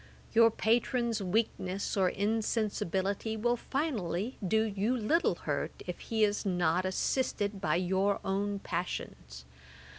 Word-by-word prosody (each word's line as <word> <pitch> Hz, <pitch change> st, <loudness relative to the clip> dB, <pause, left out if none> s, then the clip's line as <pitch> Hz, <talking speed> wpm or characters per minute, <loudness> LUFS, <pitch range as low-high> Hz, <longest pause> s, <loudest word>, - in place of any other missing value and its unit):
Your 230 Hz, 0 st, +7 dB
Patron's 235 Hz, 0 st, +1 dB
weakness 195 Hz, -1 st, -1 dB
or 190 Hz, -2 st, +3 dB
insensibility 210 Hz, -1 st, -1 dB
will 240 Hz, +2 st, +2 dB
finally 235 Hz, -, -2 dB
do 220 Hz, +4 st, +2 dB
you 215 Hz, +3 st, 0 dB
little 305 Hz, +10 st, +2 dB
hurt, -, -, -3 dB
if -, -, -5 dB
he 220 Hz, -2 st, 0 dB
is 205 Hz, 0 st, +2 dB
not 180 Hz, -2 st, +1 dB
assisted 205 Hz, 0 st, -1 dB
by 155 Hz, -5 st, +1 dB
your 190 Hz, +3 st, +1 dB
own 200 Hz, +1 st, 0 dB
passions. 115 Hz, -, -5 dB
205 Hz, 120 wpm, -31 LUFS, 185-225 Hz, -, Your